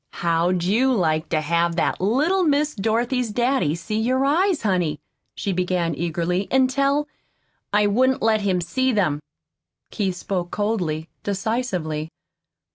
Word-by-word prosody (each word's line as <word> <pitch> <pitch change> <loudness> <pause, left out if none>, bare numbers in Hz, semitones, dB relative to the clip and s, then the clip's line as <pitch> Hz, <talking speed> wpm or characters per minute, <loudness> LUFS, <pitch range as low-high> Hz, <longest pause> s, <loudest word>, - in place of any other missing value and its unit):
"How'd 170 +1 +1
you 230 +9 +2
like 160 -8 0
to 155 - +1
have 170 +2 +1
that 170 - 0
little 300 - +2
Miss 300 -1 +2
Dorothy's 235 +4 0
daddy 240 - +1
see 215 +6 -3
your 255 +4 +1
eyes, 340 +3 +2
honey," 180 -7 0 0.4
she 200 - -2
began 180 -2 0
eagerly, 175 +3 -1
"an' 260 -1 +3
tell 280 +2 +1 0.3
" - - -45 0.3
"I 210 0 +3
wouldn't 255 +6 +2
let 220 -1 +3
him 190 -3 +1
see 260 +10 0
them." 175 -10 +1 0.7
Keith 195 -4 -1
spoke 180 -1 -3
coldly, 180 -8 -2
decisively. 190 -7 -2
200 Hz, 140 wpm, -22 LUFS, 170-255 Hz, 0.7 s, an